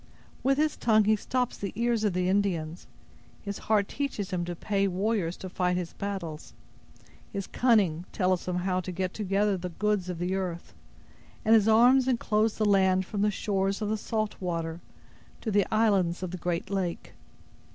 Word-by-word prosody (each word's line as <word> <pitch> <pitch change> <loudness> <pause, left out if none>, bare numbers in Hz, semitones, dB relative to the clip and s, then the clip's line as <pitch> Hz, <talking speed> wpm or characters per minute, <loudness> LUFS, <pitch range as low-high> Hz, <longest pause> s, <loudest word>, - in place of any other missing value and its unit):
With 270 +1 +2
his 305 0 +1
tongue 215 -2 +4
he 215 +1 +4
stops 250 +3 -2
the 200 - -4
ears 235 0 +1
of 205 -3 +1
the 180 0 0
Indians; 180 -4 -1 0.6
his 200 -1 -5
heart 205 -2 +3
teaches 240 -9 -3
him 180 -2 -1
to 175 0 -4
pay 200 +2 0
warriors 190 -2 -1
to 190 - -7
fight 180 -1 0
his 175 -2 -4
battles; 185 -6 -5 0.8
his 195 -1 -4
cunning 200 -11 +2
tells 185 -2 0
him 180 - -1
how 180 +1 0
to 185 0 -5
get 185 +1 -3
together 200 -1 +1
the 180 0 -5
goods 205 +1 -1
of 180 - -3
the 180 +2 -2
earth; 180 -3 -4 0.7
and 220 - +5
his 220 -2 +5
arms 245 +4 +5
inclose 220 -3 +1
the 215 - +1
land 190 -2 +3
from 205 +1 -3
the 210 - +3
shores 195 -1 -1
of 210 -2 -2
the 215 - +1
salt 215 0 -2
water 165 -2 -3 0.6
to 220 - -3
the 200 -2 +3
islands 195 -6 +2
of 180 - -3
the 185 - -4
great 175 +2 -3
lake. 185 -3 -3
195 Hz, 185 wpm, -28 LUFS, 180-215 Hz, 0.8 s, and